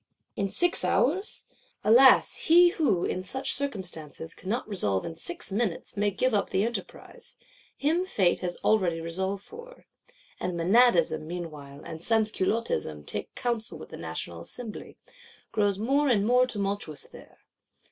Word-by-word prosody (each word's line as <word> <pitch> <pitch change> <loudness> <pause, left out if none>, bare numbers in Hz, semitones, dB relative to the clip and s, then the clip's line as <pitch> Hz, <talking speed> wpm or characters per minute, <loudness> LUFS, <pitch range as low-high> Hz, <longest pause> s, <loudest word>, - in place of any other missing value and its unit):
In 200 -1 -1
six 350 - +2
hours? 370 - +1 0.4
Alas, 250 +5 +6
he 350 +2 +7
who, 295 - +1
in 185 - -2
such 265 +8 -1
circumstances, 175 - -3
cannot 215 +6 -3
resolve 105 - -1
in 165 - -5
six 335 - -5
minutes, 200 -3 -2
may 205 0 +1
give 255 +5 0
up 205 - +1
the 190 - +1
enterprise: 235 +1 -7 0.4
him 320 +5 +1
Fate 195 - +1
has 180 -1 -3
already 185 -6 +2
resolved 190 +4 -3
for. 475 +2 -13 0.5
And 180 -1 -3
Menadism, 170 -5 +3
meanwhile, 150 -5 -7
and 160 - -8
Sansculottism 215 - 0
takes - - -3
counsel 235 -3 -2
with - - -11
the - - -9
National 85 +1 -6
Assembly; 225 - -8 0.5
grows 205 -2 +1
more 275 +7 +1
and 205 -5 +3
more 250 +2 +4
tumultuous 200 - -3
there. - - -15
205 Hz, 140 wpm, -27 LUFS, 170-250 Hz, 0.5 s, he